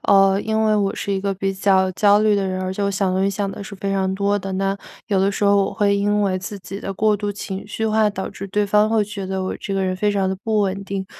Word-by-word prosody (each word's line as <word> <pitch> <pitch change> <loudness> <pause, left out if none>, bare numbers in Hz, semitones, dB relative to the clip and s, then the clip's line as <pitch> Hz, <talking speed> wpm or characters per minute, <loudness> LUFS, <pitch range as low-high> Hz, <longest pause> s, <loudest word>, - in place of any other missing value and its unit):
呃， 195 0 +4
因 220 +1 0
为 215 -1 +3
我 200 -2 +1
是 200 - -3
一 195 - -1
个 200 0 -1
比 195 +1 -1
较 190 -1 +2
焦 205 +2 +4
虑 215 -1 +3
的 200 -1 0
人， 185 0 -2
而 185 - -2
且 200 - -3
我 200 - +1
想 195 -1 0
东 190 - +1
西 195 - +2
想 200 0 -2
得 200 - -7
是 200 - -8
非 195 +1 -2
常 190 -1 0
多 200 +1 +1
的， 195 0 -6
那 195 +1 0 0.3
有 195 -3 +2
的 195 +1 +3
时 200 - -2
候 200 0 +4
我 - - -4
会 200 -1 +2
因 205 +1 +1
为 190 -2 +1
自 195 +2 -7
己 195 +1 -8
的 195 - -4
过 215 +2 +2
度 205 0 -3
情 195 -1 -6
绪 220 +2 -3
化 215 0 +3
导 195 -2 -4
致 195 0 -7
对 205 +2 0
方 210 +1 +3
会 220 -1 +2
觉 200 -2 -6
得 190 0 -2
我 185 - -3
这 195 - -4
个 195 0 0
人 185 0 0
非 205 +3 +1
常 195 -2 0
地 190 - -1
不 220 -1 +1
稳 195 -1 -1
定， 195 -1 -4
200 Hz, 320 characters per minute, -21 LUFS, 190-205 Hz, 0.3 s, 呃